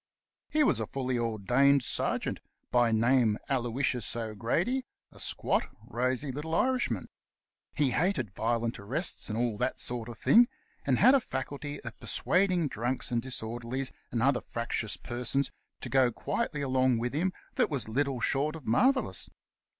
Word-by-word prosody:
He 305 Hz, 0 st, +3 dB
was -, -, +3 dB
a -, -, -2 dB
fully 130 Hz, -2 st, -2 dB
ordained 125 Hz, +5 st, +3 dB
sergeant -, -, -1 dB, 0.2 s
— -, -, -50 dB
by 120 Hz, -2 st, +4 dB
name 115 Hz, -1 st, +3 dB
Aloysius 125 Hz, -2 st, -1 dB
O'Grady; 120 Hz, -, -1 dB, 0.3 s
a -, -, -16 dB
squat, -, -, 0 dB, 0.2 s
rosy 130 Hz, +4 st, -1 dB
little 150 Hz, +5 st, -3 dB
Irishman. 255 Hz, +5 st, +1 dB, 0.7 s
He 140 Hz, -3 st, +2 dB
hated 150 Hz, -, 0 dB
violent 115 Hz, +2 st, -1 dB
arrests 130 Hz, -, -1 dB
and 110 Hz, -, -2 dB
all 115 Hz, -3 st, 0 dB
that 125 Hz, +1 st, -1 dB
sort 120 Hz, -1 st, +1 dB
of 115 Hz, -, -8 dB
thing, 240 Hz, +2 st, +6 dB, 0.4 s
and -, -, +3 dB
had 260 Hz, -, +7 dB
a 275 Hz, -, +6 dB
faculty 145 Hz, -, -5 dB
of 115 Hz, -2 st, -9 dB
per -, -, -11 dB
suading 180 Hz, -3 st, +2 dB
drunks 120 Hz, +2 st, -3 dB
and 120 Hz, -1 st, +1 dB
disorderlies 120 Hz, +1 st, -3 dB, 0.2 s
and 115 Hz, -1 st, 0 dB
other 135 Hz, -2 st, +3 dB
fractious 115 Hz, -2 st, -3 dB
persons 125 Hz, +3 st, -2 dB, 0.3 s
to -, -, -5 dB
"go 130 Hz, -2 st, +4 dB
quietly 150 Hz, -, -2 dB
along 130 Hz, -2 st, +2 dB
wid 120 Hz, +2 st, -2 dB
him," 175 Hz, +6 st, +1 dB, 0.2 s
that -, -, +2 dB
was 140 Hz, -7 st, 0 dB
little 135 Hz, +3 st, 0 dB
short 145 Hz, +6 st, 0 dB
of 155 Hz, -5 st, -10 dB
mar 245 Hz, -, +5 dB
vellous. 265 Hz, -1 st, -2 dB
130 Hz, 160 wpm, -30 LUFS, 115-145 Hz, 0.7 s, had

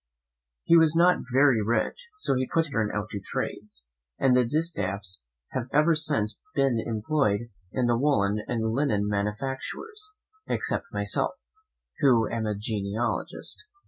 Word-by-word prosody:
He 170 Hz, -, +5 dB
was 160 Hz, -1 st, +5 dB
not 175 Hz, +2 st, +5 dB
very 130 Hz, -3 st, +5 dB
rich, 120 Hz, -, -1 dB
so 425 Hz, -, 0 dB
he 130 Hz, 0 st, 0 dB
put 165 Hz, -1 st, +3 dB
his 150 Hz, -, -9 dB
children 110 Hz, -5 st, +1 dB
out 105 Hz, 0 st, -3 dB
to 100 Hz, -, -3 dB
trades, 100 Hz, -9 st, -5 dB, 0.3 s
and 130 Hz, -2 st, +4 dB
the 125 Hz, -, +5 dB
Distaffs 100 Hz, -, -1 dB, 0.3 s
have 130 Hz, -2 st, -3 dB
ever 155 Hz, +3 st, +4 dB
since 145 Hz, -9 st, 0 dB, 0.2 s
been 135 Hz, -4 st, +2 dB
employed 115 Hz, -1 st, 0 dB, 0.2 s
in 130 Hz, -, 0 dB
the 120 Hz, -1 st, +2 dB
woollen 105 Hz, -7 st, +2 dB
and 110 Hz, -1 st, -1 dB
linen 115 Hz, -7 st, +1 dB
manufactures, 135 Hz, -, -3 dB, 0.4 s
except -, -, -1 dB
myself, -, -, -1 dB, 0.6 s
who 125 Hz, -6 st, +4 dB
am 115 Hz, -2 st, -2 dB
a 105 Hz, -, -1 dB
genealogist. 105 Hz, +1 st, -3 dB
120 Hz, 145 wpm, -27 LUFS, 105-145 Hz, 0.6 s, He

